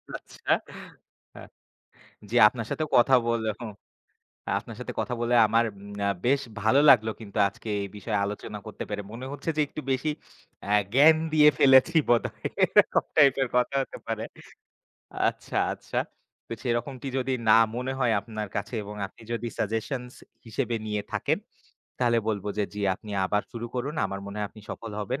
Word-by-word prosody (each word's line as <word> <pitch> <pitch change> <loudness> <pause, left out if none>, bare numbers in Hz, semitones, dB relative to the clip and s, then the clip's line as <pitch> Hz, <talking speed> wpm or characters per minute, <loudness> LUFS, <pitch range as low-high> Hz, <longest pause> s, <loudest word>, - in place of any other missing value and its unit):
আচ্ছা। - - -11 0.9
আ - - -9 0.9
জি 120 - -1
আপনার 115 -1 -6
সাথে 155 - -1
কথা 130 +2 +5
বলে 115 -2 0
হুম, 110 -3 -6 0.9
আপনার - - -7
সাথে - - -6
কথা 125 - -2
বলে 120 +1 0
আমার 115 +2 +3
এম 100 0 -3
বেশ 140 +2 +3 0.2
ভালো 110 +6 +4
লাগলো 110 -4 +6
কিন্তু 105 0 -9
আজকে 105 - -14
এই 100 - -3
বিষয়ে 105 0 -2
আলোচনা 105 +1 -6
করতে 110 - -6
পেরে। 105 -1 -3
মনে 120 +3 -7
হচ্ছে 145 +3 -5
যে - - +4
একটু 155 - -7
বেশি 130 +4 0 0.6
আ - - +4 0.2
জ্ঞান 155 +4 +7 0.2
দিয়ে 150 -1 +7
ফেলেছি 135 +5 +6
বোধহয়। 120 -1 +1 0.3
এরকম - - 0
টাইপের 140 -3 +5
কথা 125 +2 +2
হতে - - -7
পারে। 110 -1 -2 1.1
আচ্ছা, - - -6 0.2
আচ্ছা। - - -4 0.5
তো - - -6
সেরকমটি 120 +2 -2
যদি 130 +1 -1 0.2
না - - +8 0.2
মনে 125 +2 -2
হয় 120 -3 +3
আপনার 105 -1 -6
কাছে - - -4
এবং 105 +1 -8
আপনি - - -18
যদি 120 0 -3
সাজেশনস 125 +4 -3 0.3
হিসেবে 120 +1 -2
নিয়ে 105 -1 -2
থাকেন। - - 0 0.6
তাহলে 120 -2 +3
বলব 100 -3 -2
যে, 105 - +3
জি 105 - -5
আপনি 105 +3 -12 0.2
আবার 105 +1 +1
শুরু 120 0 -5
করুন। 135 +5 -3
আমার 100 0 -5
মনে 100 - -7
হয় 105 - -1
আপনি 110 - -14
সফল 115 - -7
হবেন 125 +7 -3
115 Hz, 165 wpm, -27 LUFS, 105-130 Hz, 1.1 s, না